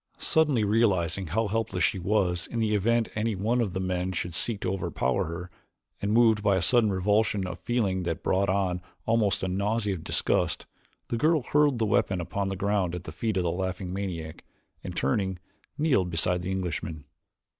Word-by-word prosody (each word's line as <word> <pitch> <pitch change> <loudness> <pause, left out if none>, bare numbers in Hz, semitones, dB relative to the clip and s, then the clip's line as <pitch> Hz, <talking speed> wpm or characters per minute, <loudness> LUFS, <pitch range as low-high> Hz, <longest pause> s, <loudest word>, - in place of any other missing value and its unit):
Suddenly 150 -8 +2
realizing 95 -5 +1
how 110 +8 0
helpless 115 +2 -1
she 95 - +2
was 90 -1 0
in 120 - -5
the 110 -2 +1
event 115 +3 +2
any 110 0 -1
one 115 +6 +1
of 100 -6 -1
the 95 - -2
men 90 0 -1
should 85 0 -3
seek 105 +5 +1
to 90 - -1
overpower 65 -9 -1
her, 85 +2 -6 0.5
and 100 - -1
moved 110 -2 +4
by 100 -2 +3
a 95 - +1
sudden 110 +3 +4
revulsion 100 +1 +1
of 90 -1 -6
feeling 100 -4 0
that 85 -3 -3
brought 95 +1 +1
on 95 -2 0 0.2
almost 110 -4 +1
a - - 0
nausea 100 +3 0
of 85 -4 -6
disgust, - - 0 0.4
the 120 - -1
girl 155 +2 +2
hurled 145 -1 +3
the 115 - +1
weapon 95 -2 +1
upon 100 +3 -2
the 95 - -2
ground 95 -2 0
at 90 - -6
the 80 - -7
feet 110 +5 -2
of 90 - +1
the 85 - 0
laughing 90 0 -3
maniac 85 -5 -5 0.4
and, - - -6
turning, 95 +7 0 0.4
kneeled 130 - +2
beside 90 +2 +1
the 90 - -4
Englishman. 85 -5 -3
95 Hz, 190 wpm, -27 LUFS, 90-110 Hz, 0.5 s, moved